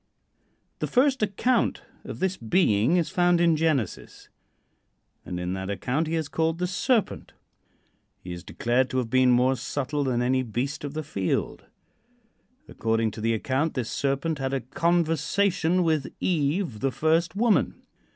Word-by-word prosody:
The - - -1
first 265 0 +2
account 215 +5 +1 0.2
of - - -6
this 190 0 0
being 115 - +2
is 170 - 0
found 175 -2 +3
in 170 -1 +4
Genesis, 150 - -2 0.9
and 90 - -5
in 90 +1 -3
that 95 0 -4
account 125 - -1
he 165 - -1
is 160 -2 -1
called 160 +2 0
the 180 - -1
"Serpent." 215 +5 -1 0.9
He 90 - -7
is 85 0 -8
declared 120 +5 0
to 130 - -2
have 120 -3 -2
been 130 0 +4
more 125 +2 +4
subtle 145 +4 -2
than 125 -2 0
any 130 +1 +2
beast 130 +5 -3
of 145 0 -5
the 155 - -3
field. 100 - -2 1.0
According 115 -1 0
to 110 - -8
the 115 +1 +1
account, 135 +7 -1
this 125 -4 -3
Serpent 140 +3 -1
had 135 0 -1
a 135 - -2
conversation 170 - +1
with 155 -4 0
Eve, 155 - 0
the 135 - +1
first 165 +5 +1
woman. 225 +1 +1
145 Hz, 155 wpm, -26 LUFS, 125-170 Hz, 1.0 s, in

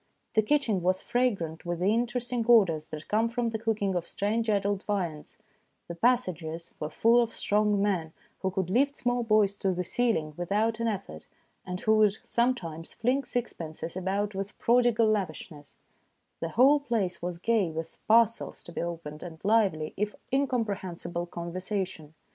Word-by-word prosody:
The 220 - +5
kitchen 225 -5 +1
was 185 +2 +2
fragrant 195 -12 -1
with 175 -1 -2
the 190 +5 +2
interesting 240 +1 -1
odours 180 -10 +5
that 155 0 -8
come 225 +2 +2
from 235 0 -1
the 220 -1 -3
cook 225 -2 -1
ing 195 -1 +1
of 175 -2 -2
strange 220 +3 -1
adult 200 -1 +1
viands; 175 -8 -3 0.5
the 170 - -5
passages 170 -6 0
were 150 - -3
full 230 +7 +4
of 230 -1 -1
strong 210 0 +1
men 185 -6 0 0.3
who 190 - 0
could 190 -1 -2
lift 280 +6 +2
small 245 0 0
boys 215 -3 +3
to 195 - 0
the 180 - -1
ceiling 180 -6 0
without 210 +6 0
an 230 - 0
effort, 200 -3 -5 0.4
and 180 0 -4
who 220 0 +3
would 215 -1 +4
sometimes 180 -10 -1
fling 255 +4 0
sixpences 165 -10 -4
about 195 +3 -1
with 195 +1 -5
prodigal 240 -1 +3
lavishness; 185 -8 -3 0.6
the 165 - -3
whole 270 - +5
place 220 -10 -1
was 175 0 -3
gay 215 -1 +1
with 160 +1 -6
parcels 230 0 +3
to - - -10
be - - -3
opened, 165 -3 -5
and 165 -3 -8
lively, 200 -8 +2
if 210 +1 -1 0.2
incomprehensible, 195 -10 -1
conversation. 175 -2 -4
200 Hz, 165 wpm, -28 LUFS, 175-230 Hz, 0.6 s, The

